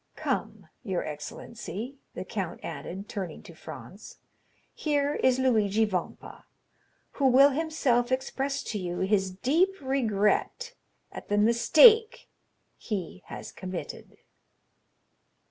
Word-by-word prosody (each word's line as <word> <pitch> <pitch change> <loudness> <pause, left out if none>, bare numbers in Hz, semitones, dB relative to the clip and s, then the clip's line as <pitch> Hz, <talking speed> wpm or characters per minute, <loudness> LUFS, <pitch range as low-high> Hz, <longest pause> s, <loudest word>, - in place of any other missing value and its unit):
Come, - - -3 0.2
your 190 -6 -2
excellency," 215 - -7 0.2
the - - -5
count - - -4
added, 195 +3 -6
turning 185 -6 -6
to - - -12
Franz, - - -11 0.6
"here 290 -1 0
is 260 -3 +2
Luigi 220 -4 +2
Vampa, 185 -5 -5 0.7
who 275 - +1
will 270 +3 +7
himself 270 -5 0
express 270 +1 -2
to 210 - -4
you 175 -1 -4
his 190 0 +1
deep 325 - +1
regret 265 - 0 0.4
at - - -10
the 205 - +1
mistake 430 - +5 0.5
he 190 -4 -5
has - - -8
committed." 185 -2 -7
235 Hz, 110 wpm, -28 LUFS, 195-275 Hz, 0.7 s, will